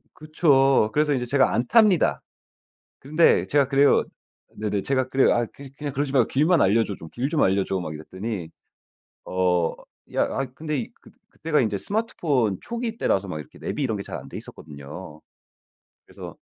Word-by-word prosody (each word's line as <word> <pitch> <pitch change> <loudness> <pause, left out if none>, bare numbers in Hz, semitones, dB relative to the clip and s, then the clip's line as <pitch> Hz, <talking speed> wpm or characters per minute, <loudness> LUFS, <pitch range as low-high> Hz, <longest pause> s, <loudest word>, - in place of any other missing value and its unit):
그쵸. 140 -6 +3
그래서 150 0 +2
인제 125 -3 -1
제가 135 +2 +2
안 120 - +1
탑니다. 210 - +4 0.8
그런데 155 +5 +3
제가 140 -2 +2
그래요. 140 +1 +4 0.5
네네 105 -2 -2
제가 130 +1 0
그래요. 135 0 +3
"아 120 0 +1
그 140 -1 -11
그냥 145 -1 -5
그러지 140 0 -2
말고 130 -5 +3
길만 155 +4 +3
알려줘. 105 +1 +2
좀 80 - -11
길 130 +3 -2
좀 155 0 +1
알려줘." 95 0 +1
막 85 - -5
이랬더니 95 +4 -6 0.8
어 90 -2 +1 0.4
야 - - +3
아 135 - -2
근데 150 -6 -3
그 - - -17 0.2
그때가 155 -1 0
인제 105 -4 -1
스마트폰 145 - -1
초기 235 -1 -5
때라서 100 +1 +1
막 85 -4 -5
이렇게 70 - -13
내비 - - -4
이런 115 -5 -1
게 100 - -5
잘 - - -7
안 - - -11
돼있었거든요. 75 +2 -10 0.8
그래서 - - -10
130 Hz, 340 characters per minute, -24 LUFS, 100-150 Hz, 0.8 s, 탑니다